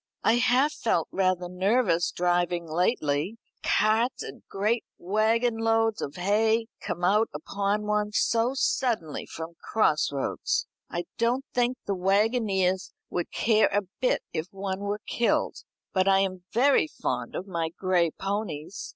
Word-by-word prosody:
I 225 - +4
have 255 +4 +3
felt 195 - 0
rather 185 -2 +1
nervous 180 -1 +2
driving 175 -1 0
lately 165 - 0 0.2
carts 220 +4 +2
and - - -9
great 215 +4 0
waggon 225 +5 +1
loads 225 -1 +2
of 140 - -4
hay 220 +5 +2 0.2
come 175 0 -4
out 210 +5 +3
upon 200 +6 -1
one 210 0 0
so 230 +4 +1
suddenly 230 - 0
from 165 +1 -7
cross 155 -11 +2
roads. 140 -1 -1 0.2
I 175 - -3 0.2
don't 245 +4 +1
think 245 +1 +1
the 200 - 0
waggoners 195 -1 +1 0.2
would 175 - -2
care 220 -1 +3
a 205 +1 +2 0.2
bit 255 - +1
if 160 +2 -2
one 195 -1 -4
were 205 +1 -3
killed. 235 - +1 0.4
But 185 0 +2
I 195 0 +5
am 185 -2 -3
very 275 +6 +4
fond - - -3
of 185 - -4
my 170 -4 -2
gray 175 0 +1
ponies. 195 -3 -4
200 Hz, 140 wpm, -27 LUFS, 180-225 Hz, 0.4 s, I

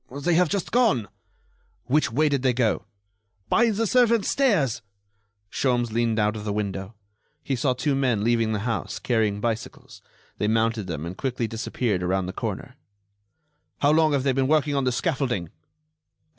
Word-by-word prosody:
"They 145 +6 -1
have 175 0 +3
just 195 +1 -2
gone." 220 - +2 0.8
"Which 140 0 +1
way 150 +6 +2
did 140 -3 0
they 130 -1 +2
go?" 120 -3 0 0.6
"By 235 0 +4
the 225 +1 0
servants' 235 -2 +3
stairs." 185 - +2 0.7
Sholmes 120 -3 0
leaned 115 0 0
out 105 0 +1
of 105 - -6
the 105 - -2
window. 100 0 -4 0.5
He 135 - -1
saw 130 +1 +1
two 140 +3 -1
men 125 -6 +1
leaving 115 -1 +2
the 105 -2 -1
house, 115 -2 -2
carrying 110 -4 0
bicycles. 115 0 -5 0.4
They 105 - +1
mounted 110 -2 +1
them 80 -3 -4
and 85 +2 -6
quickly 125 -1 -2
disappeared 115 -3 -2
around 95 +1 0
the 95 - -5
corner. - - -5 1.0
"How 145 - +4
long 155 -1 +3
have 140 -2 +1
they 135 - +2
been 130 0 +1
working 150 -1 +2
on 140 -2 0
this 125 -1 +1
scaffolding?" 125 - -1
125 Hz, 170 wpm, -24 LUFS, 110-145 Hz, 1.0 s, By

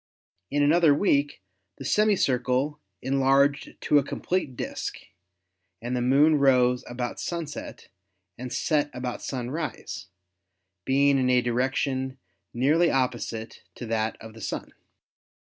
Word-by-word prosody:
In 145 +1 +1
another 155 0 +5
week 145 - +1 0.3
the - - -8
semi 210 0 +3
circle 135 0 0 0.2
en 135 +1 0
larged 140 +1 +2
to 145 - +4
a - - -1
complete 160 -2 -2
disk - - -4 0.8
and 120 +2 -3
the 125 - 0
Moon 145 +5 +4
rose 125 -2 +3
about 120 0 -4
sunset 165 -4 -6 0.5
and 125 0 -7
set 150 +1 +1
about 125 0 -4
sunrise, 130 - -5 0.8
being 140 +1 +3
in 130 -1 +2
a 125 0 +5
direction 130 +2 -1 0.3
nearly 150 +8 +3
opposite 120 -3 -2
to 120 - -7
that 110 -1 -1
of 110 0 -11
the 110 - -12
Sun. - - -5
135 Hz, 130 wpm, -26 LUFS, 125-145 Hz, 0.8 s, another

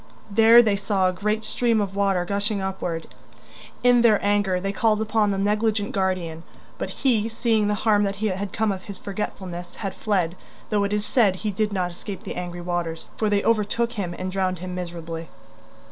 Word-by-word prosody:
There 225 +3 +8
they 210 -3 +2
saw 195 -2 +1
a - - -2
great 210 +4 -1
stream 230 0 +1
of 200 -2 -2
water 195 -3 +1
gushing 200 +2 -1
upward. 180 -4 -3 0.8
In 245 -1 +6
their 220 -3 +5
anger 205 -3 +2
they 195 +2 -2
called 215 +1 +2
upon 220 -1 +1
the 195 - 0
negligent 210 +1 +1
guardian, 185 -4 -1 0.4
but - - -3
he, 230 -5 +1
seeing 225 -2 +1
the 210 - +1
harm 210 -2 +5
that 200 0 -2
had 200 -2 -2
come 220 +1 +1
of 190 -1 -5
his 200 -3 -7
forgetfulness, 185 -3 -5
had 195 -3 -4
fled, 185 -6 0 0.4
though 205 -1 +2
it 200 - -2
is 210 0 0
said 215 -8 +3
he 210 +2 -3
did 210 +2 0
not 180 -3 -1
escape 195 +2 -8
the 200 - -5
angry 175 -1 -5
waters, 175 -2 -3
for 215 - 0
they 205 -1 +2
overtook 230 +1 +1
him 185 -7 -4
and 185 0 -4
drowned 185 -1 0
him 180 +1 -6
miserably. 170 -2 -6
200 Hz, 190 wpm, -24 LUFS, 185-215 Hz, 0.8 s, There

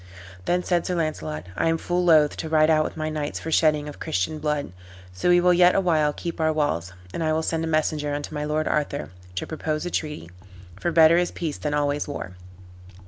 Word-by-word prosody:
Then 180 +1 +1
said 175 -2 +1
Sir 180 - -1
Launcelot, 85 - -3
"I - - +1
am 165 - +1
full 175 +2 -1
loath 155 -4 +5
to 160 - -4
ride 155 0 +4
out 155 -1 +4
with - - -6
my 155 0 -2
knights 150 -1 -3
for 160 - -5
shedding 150 -2 +3
of 150 - -9
Christian 95 - -2
blood; 150 - -2 0.4
so 90 - 0
we 175 0 +6
will 180 0 +4
yet 180 0 +5
a - - +4
while 160 -5 +2
keep 165 +2 -5
our 160 0 +3
walls, 145 - -1 0.2
and 165 - -2
I 155 - +1
will 160 +1 0
send 165 0 -1
a - - -2
messenger 155 -2 0
unto 145 +1 -4
my 150 -1 -3
lord 155 +1 -1
Arthur, 145 -6 -1 0.2
to 95 - -2
propose 155 0 -3
a 175 - -3
treaty; 150 - -4 0.5
for 175 - -1
better 165 0 +6
is 175 0 +2
peace 160 -4 -4
than 150 -1 -2
always 145 0 0
war." 95 -10 -6
155 Hz, 225 wpm, -24 LUFS, 150-165 Hz, 0.5 s, we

